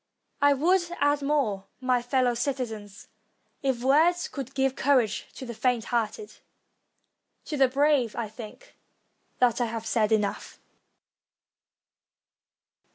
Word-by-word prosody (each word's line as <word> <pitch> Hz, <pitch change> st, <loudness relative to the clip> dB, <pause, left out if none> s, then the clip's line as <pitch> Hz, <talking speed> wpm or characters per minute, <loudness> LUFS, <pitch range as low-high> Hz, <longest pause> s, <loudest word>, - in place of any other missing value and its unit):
I 285 Hz, 0 st, +6 dB
would 350 Hz, +7 st, +3 dB, 0.2 s
add 290 Hz, 0 st, +2 dB
more, 260 Hz, -10 st, 0 dB
my 255 Hz, -1 st, +1 dB
fellow 245 Hz, 0 st, +1 dB
citizens, 230 Hz, -6 st, -4 dB, 0.5 s
if 260 Hz, -3 st, -1 dB
words 325 Hz, +6 st, +3 dB
could 275 Hz, -2 st, -7 dB
give 265 Hz, -1 st, +1 dB
cour 275 Hz, -2 st, +4 dB
age 215 Hz, -3 st, -5 dB
to 260 Hz, -, -7 dB
the 240 Hz, -, -6 dB
faint 240 Hz, 0 st, 0 dB
hearted; 235 Hz, -, -2 dB, 1.1 s
to 305 Hz, -, -4 dB
the 270 Hz, -2 st, +4 dB
brave 275 Hz, -3 st, +2 dB
I 235 Hz, -, -3 dB
think 220 Hz, -, -12 dB, 0.6 s
that 250 Hz, -1 st, +2 dB
I -, -, +2 dB
have 225 Hz, -1 st, -5 dB
said 220 Hz, -1 st, +1 dB
enough. 210 Hz, -2 st, -1 dB
255 Hz, 125 wpm, -27 LUFS, 225-280 Hz, 1.1 s, I